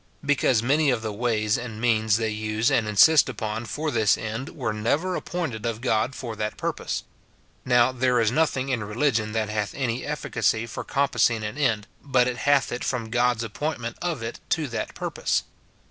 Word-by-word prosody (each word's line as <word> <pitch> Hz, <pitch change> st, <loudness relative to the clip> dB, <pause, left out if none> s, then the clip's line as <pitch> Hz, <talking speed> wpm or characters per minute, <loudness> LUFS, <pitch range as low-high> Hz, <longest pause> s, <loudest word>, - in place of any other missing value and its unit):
Because 130 Hz, -5 st, +2 dB
many 145 Hz, +4 st, +3 dB
of 120 Hz, -4 st, 0 dB
the 110 Hz, -1 st, -3 dB
ways 110 Hz, -1 st, 0 dB
and 115 Hz, -3 st, -7 dB
means 110 Hz, -2 st, +2 dB
they 110 Hz, -1 st, -1 dB
use 110 Hz, +1 st, 0 dB
and 110 Hz, -, +2 dB
insist 140 Hz, +9 st, +6 dB
upon 110 Hz, -1 st, -4 dB
for 150 Hz, +6 st, -2 dB
this 110 Hz, -4 st, +3 dB
end 110 Hz, +5 st, -4 dB
were 120 Hz, -7 st, -3 dB
never 145 Hz, +13 st, 0 dB
appointed 155 Hz, -12 st, -4 dB
of 115 Hz, -2 st, -2 dB
God 120 Hz, +1 st, 0 dB
for 120 Hz, -4 st, -5 dB
that 105 Hz, 0 st, -3 dB
purpose. -, -, -3 dB, 0.6 s
(Now, 125 Hz, 0 st, +4 dB
there 125 Hz, -1 st, +2 dB
is 115 Hz, -1 st, +2 dB
nothing 135 Hz, -2 st, +1 dB
in 125 Hz, -5 st, -1 dB
religion 110 Hz, 0 st, 0 dB
that 110 Hz, -1 st, -1 dB
hath 105 Hz, -1 st, -2 dB
any 125 Hz, -2 st, -2 dB
efficacy 115 Hz, -6 st, 0 dB
for 115 Hz, -, -6 dB
compassing 125 Hz, -5 st, +1 dB
an 105 Hz, +2 st, -4 dB
end, 115 Hz, -8 st, +1 dB, 0.2 s
but 130 Hz, -3 st, +2 dB
it 125 Hz, -1 st, -2 dB
hath 140 Hz, -2 st, +2 dB
it 120 Hz, -, -3 dB
from 115 Hz, -4 st, -2 dB
God's 120 Hz, -1 st, +2 dB
appointment 120 Hz, 0 st, -4 dB
of 165 Hz, -9 st, -2 dB
it 115 Hz, -, -5 dB
to 155 Hz, -2 st, +1 dB
that 115 Hz, -, -4 dB
purpose.) -, -, -1 dB
120 Hz, 185 wpm, -25 LUFS, 110-130 Hz, 0.6 s, insist